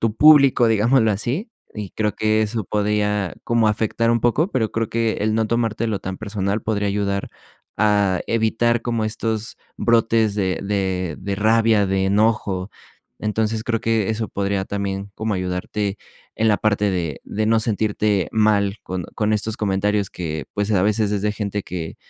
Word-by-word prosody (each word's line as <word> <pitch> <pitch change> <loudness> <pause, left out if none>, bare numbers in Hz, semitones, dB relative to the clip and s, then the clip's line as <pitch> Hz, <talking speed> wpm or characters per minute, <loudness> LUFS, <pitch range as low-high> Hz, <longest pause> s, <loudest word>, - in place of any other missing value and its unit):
tu 110 -1 0
público, 140 -5 +6
digámoslo 110 +1 +3
así, 130 - -3 0.2
y 105 -3 -6
creo 105 -1 -1
que 110 0 +2
eso 110 0 -2
podría 105 -3 0
como 115 -2 +2
afectar 110 +2 0
un 115 -1 +2
poco, 150 - +1
pero 110 - -1
creo 115 -1 -1
que 115 -1 0
el 110 +1 +1
no 110 -1 +1
tomártelo 115 -2 -1
tan 95 0 -5
personal 100 -1 -2
podría 105 -2 -1
ayudar 100 -1 -1 0.5
a 100 -3 +2
evitar 115 +1 +1
como 115 -2 -1
estos 110 0 -2 0.2
brotes 115 -2 +2
de 95 -3 -1
de 95 -4 -2
de 100 +1 -3
rabia, 110 -1 +3
de 95 0 0
enojo. 100 -2 +1 0.5
Entonces, 110 +1 -1
creo 115 -1 -1
que 115 -3 +1
eso 110 0 -2
podría 100 -1 -1
también 100 0 -3
como 110 -1 -2
ayudarte 95 +3 -2 0.4
en 110 0 +2
la 105 - +4
parte 105 -1 +1
de 85 -6 -3
de 110 +1 -2
no 110 0 +3
sentirte 105 -4 0
mal 105 -2 +2
con 90 -1 -4
con 110 0 0
estos 110 +1 0
comentarios 100 0 0
que, 80 -5 -4
pues, 105 +1 -1
a 95 -2 +3
veces 105 0 +1
es 100 -1 -1
de 105 - +1
gente 105 -1 -3
que 85 -3 -6
105 Hz, 170 wpm, -21 LUFS, 100-110 Hz, 0.5 s, público